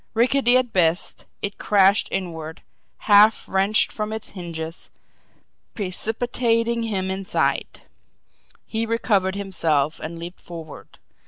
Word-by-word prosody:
Rickety 250 +1 +4
at 250 -3 -1
best, 175 0 +1 0.2
it 200 0 -4
crashed 200 0 +4
inward, 160 -4 -5 0.4
half 210 +1 +6
wrenched 195 +3 +2
from 215 0 -4
its 220 -1 -6
hinges, 165 -3 -6 0.9
precipitating 230 +3 0
him 195 -4 -2
inside. 195 +2 -1 0.8
He 225 0 -2
recovered 200 -4 +1
himself 165 -7 0
and 165 +2 -6
leaped 170 +2 -8
forward. 165 -3 -11
195 Hz, 105 wpm, -23 LUFS, 175-225 Hz, 0.9 s, half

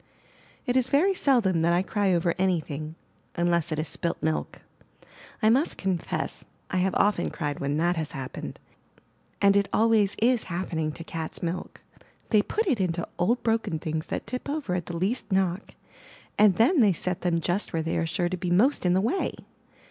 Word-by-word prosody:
It 250 -2 0
is 260 -1 +2
very 355 +8 +3
seldom 235 - +2
that 170 +1 +3
I 175 +2 +2
cry 200 -1 0
over 170 -1 +2
any 185 -2 +2
thing, 155 +1 -6 0.4
unless 170 -1 +1
it 155 - -1
is 155 +1 -2
''spilt 170 - -2
milk.*' 155 0 -2 0.8
I 220 - +6
must 275 +7 +2
confess, 190 -3 -2 0.3
I 185 - 0
have 185 +1 +1
often 205 +1 +2
cried 145 -3 -4
when 140 +1 -1
that 175 +2 +1
has 160 -2 -3
happened; 130 -1 -6 0.9
and 200 0 +6
it 200 -1 +2
always 220 -3 +3
is 240 0 +2
happening 170 -3 -2
to 165 - -8
cats* 160 0 -5
milk. 175 +1 -4 0.5
They 215 -3 +5
put 440 - -1
it 270 - +1
into 175 -2 -1
old 230 +8 +1
broken 225 -7 0
things 155 -1 -4
that - - -4
tip 250 +5 -5
over 285 -10 -2
at 180 -2 -2
the 170 - -4
least 205 +6 -1
knock, 190 0 0 0.6
and 205 -3 +5
then 285 - +4
they 210 -6 +5
set 180 +1 -3
them 170 -2 +1
just 175 +5 -1
where 165 -1 -1
they 165 - -2
are 165 - -1
sure 170 +2 0
to 185 +1 -3
be 180 0 -3
most 200 +4 +3
in 175 - +3
the 190 - +3
way. 290 - -1
185 Hz, 195 wpm, -26 LUFS, 165-220 Hz, 0.9 s, I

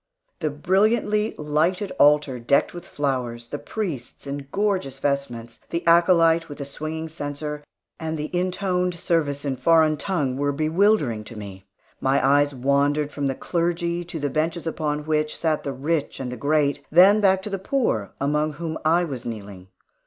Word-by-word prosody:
The 155 -3 0
brilliantly 210 +7 +1
lighted 165 +7 0
altar, 145 -3 +4
decked 120 +4 +2
with 175 - -9
flowers, 125 -5 -3
the 145 - -4
priests 160 - -5
in 140 0 -5
gorgeous 190 -10 -1
vestments, 135 -5 -3
the 170 +1 -3
acolyte 170 -1 +4
with 145 - -8
the 140 - -5
swinging 155 +3 -5
censer, 150 -1 -5 0.4
and 160 -1 -3
the 155 +3 -4
intoned 180 0 0
service 160 -5 0
in 135 -2 -1
foreign 155 +2 +4
tongue, 145 -8 -1
were 145 +1 +1
bewildering 155 - +2
to 110 +1 -10
me. 95 -2 -9 0.3
My 135 +1 +2
eyes 145 +1 +4
wandered 140 +3 +1
from 145 -1 -2
the 135 - -1
clergy 170 +1 -1
to 165 -1 -6
the 145 -1 -2
benches 160 +3 -1
upon 150 -2 -2
which 155 -1 0
sat 160 -2 0
the 140 - -3
rich 145 +3 -2
and 130 -2 -4
the - - -4
great, 145 +1 +1
then 190 +6 +6
back 190 -1 +3
to 210 - -5
the 195 - -2
poor, 190 - -1
among 150 +2 0
whom 160 0 -5
I 165 +3 +3
was 135 -8 -5
kneeling. 100 -5 -7
150 Hz, 165 wpm, -24 LUFS, 140-170 Hz, 0.4 s, then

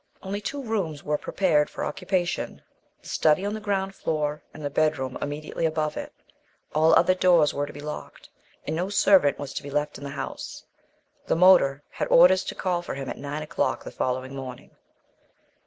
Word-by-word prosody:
Only 200 +2 -4
two 280 +6 -4
rooms 190 - -2
were 150 0 -1
prepared 160 -6 +1
for - - -4
occupation: 180 -2 -2 0.4
the - - -13
study 155 +5 +2
on 205 - -1
the 215 - -4
ground 195 -2 -1
floor 150 -4 -2
and 155 - -9
the 145 - -2
bedroom 140 -4 0
immediately 150 +3 -4
above 155 -1 0
it; - - -6 0.6
all 160 +2 +5
other 185 - +5
doors 175 -5 +4
were 145 0 -2
to - - -8
be 145 - -10
locked, 150 0 -8 0.4
and 155 - -2
no 180 +4 -1
servant 195 -7 +4
was 140 -2 -6
to - - -4
be 145 - -8
left 150 +1 -2
in - - -10
the 140 - -5
house. 140 - -6 0.6
The - - +2
motor 160 -6 +5
had - - -3
orders 185 +2 +6
to - - -5
call 180 -2 -1
for 175 - -6
him 135 -1 -5
at - - -5
nine 145 +2 -4
o'clock 155 +2 -1
the - - -8
following 130 +1 -2
morning. 130 -2 -8
155 Hz, 190 wpm, -26 LUFS, 145-185 Hz, 0.6 s, orders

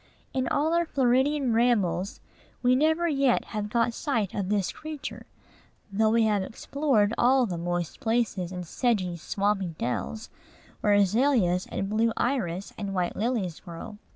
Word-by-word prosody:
In 260 -1 0
all 315 +3 +1
our 340 0 +2
Floridian 265 0 +2
rambles, 210 -5 +1 0.4
we 250 +1 +5
never 320 +5 +2
yet 275 -5 +2
have 210 -1 -2
got 235 +1 +1
sight 230 - -1
of 195 -2 -2
this 205 -3 +1
creature; 310 -2 -7 0.6
though 215 +2 +2
we 230 +1 +3
have 210 -2 +2
explored 225 +1 0
all 255 +1 +4
the 185 -6 -3
moist 175 -1 -3
places, 220 -6 0
and 180 -1 -5
sedgy, 190 -3 0
swampy 195 0 -1
dells, 215 - -3 0.5
where 210 - +3
azaleas 205 -2 +3
and 195 - -3
blue 220 +3 +2
iris 200 -8 -1
and 200 -2 -3
white 180 -1 -1
lilies 210 -7 -1
grow. 175 +4 -9
220 Hz, 150 wpm, -27 LUFS, 190-255 Hz, 0.6 s, we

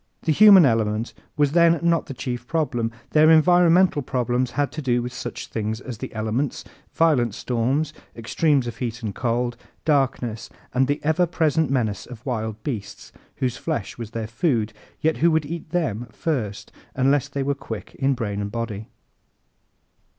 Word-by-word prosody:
The 160 - +1
human 195 0 +8
element 110 -2 0 0.2
was 145 -2 +3
then 170 0 +4
not 170 -1 +2
the 135 - -7
chief 125 -2 -5
problem. 120 -8 -1 0.2
Their 155 +1 +6
environmental 175 0 +5
problems 125 -1 -1
had 145 +2 -1
to 155 - -5
do 125 -3 +1
with 125 0 -5
such 120 -1 -6
things 110 0 -3
as 125 -4 -8
the - - -6
elements, 110 +6 -2 0.3
violent 130 - +2
storms, 130 +6 -1 0.2
extremes 135 +4 +1
of 120 - -6
heat 120 -1 -4
and 105 -2 -3
cold, 120 +1 -1 0.3
darkness, 125 -6 0 0.3
the 135 +3 +2
ever 160 +4 +2
present 160 -3 +1
menace 115 -7 -1
of 120 -2 -11
wild 110 -4 -3
beasts 110 -8 -6 0.2
whose 125 -1 -2
flesh 140 -10 -4
was 115 -3 -5
their 115 -1 -4
food, 115 -2 0 0.3
yet 160 0 +1
who 170 - +4
would 160 -2 +1
eat 165 +1 -6
them 140 - -1
first 110 -7 -3 0.2
unless 135 +1 +2
they 140 -1 -3
were 140 +1 +1
quick 115 -5 -8
in 135 0 +1
brain 105 -4 -3
and 100 0 -4
body. 115 -3 -4
130 Hz, 165 wpm, -23 LUFS, 115-155 Hz, 0.3 s, human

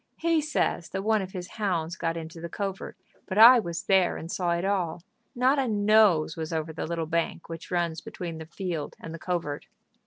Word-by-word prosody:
"He 330 -1 +2
says 300 - -1
that 190 0 -4
one 215 0 +2
of 190 0 -7
his 180 -1 -5
hounds 175 -6 -2
got 165 -2 -2
into 165 0 -8
the 170 - -5
covert, 195 +1 -5 0.3
but 190 - -3
I 240 +3 +10
was 170 -5 -4
there 190 -2 +3
and 165 - -7
saw 180 -2 -1
it 170 +2 -1
all. 180 -4 -1 0.3
Not 260 +3 +3
a 265 - +1
nose 205 -7 +4
was 160 0 -5
over 160 0 -2
the 160 - -4
little 165 -1 -2
bank 170 +1 -2
which 165 0 -8
runs 170 -2 -1
between 180 -7 -6
the 160 - -8
field 170 -4 -4
and 165 - -8
the 165 - -7
covert." 165 -5 -3
175 Hz, 210 wpm, -27 LUFS, 165-205 Hz, 0.3 s, I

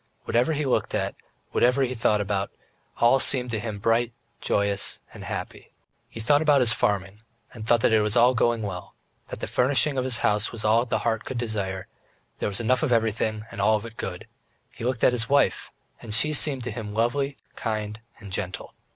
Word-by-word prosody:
Whatever 125 +7 +1
he 150 0 -1
looked 130 - 0
at, - - -1 0.4
whatever 125 +3 +3
he 130 -1 -1
thought 110 -3 +2
about, 100 -1 -1
it - - -39 0.4
all 120 +3 +5
seemed 125 -2 +1
to 110 - -1
him 105 -1 -4
bright, 115 +3 +1 0.3
joyous, 100 0 0
and - - -9
happy. - - -6 0.4
He - - -9
thought 145 +7 +3
about 150 -3 +4
his 115 -3 +4
farming, 100 +1 -1 0.3
and 110 -2 -8
thought 120 -2 +4
that 110 - +3
it 110 - +5
was 105 +1 +1
all 120 +1 +5
going 115 -1 +1
well, 90 -3 -6 0.3
that - - -8
the - - -1
furnishing 135 +2 +2
of - - 0
his 130 -2 0
house 105 +1 +2
was 115 -2 -5
all 115 +3 +3
the - - 0
heart 115 -2 0
could 130 - -5
desire 100 -5 -3 0.5
there - - -1
was 100 - -3
enough 125 +2 +2
of 155 - 0
everything 110 -1 0
and 100 - -5
all 110 +2 +4
of 105 +1 -3
it 115 -1 -10
good; - - -6 0.5
he - - -10
looked 125 -1 -1
at - - +5
his 115 -2 0
wife, 140 +1 +2 0.3
and 110 -3 -3
she 150 +7 +2
seemed 135 -3 +3
to 120 - -4
him 105 -2 -6
lovely, 135 +5 0 0.2
kind, 110 -1 -3 0.2
and 100 -2 -10
gentle. 95 -1 -5
115 Hz, 210 wpm, -25 LUFS, 105-125 Hz, 0.5 s, all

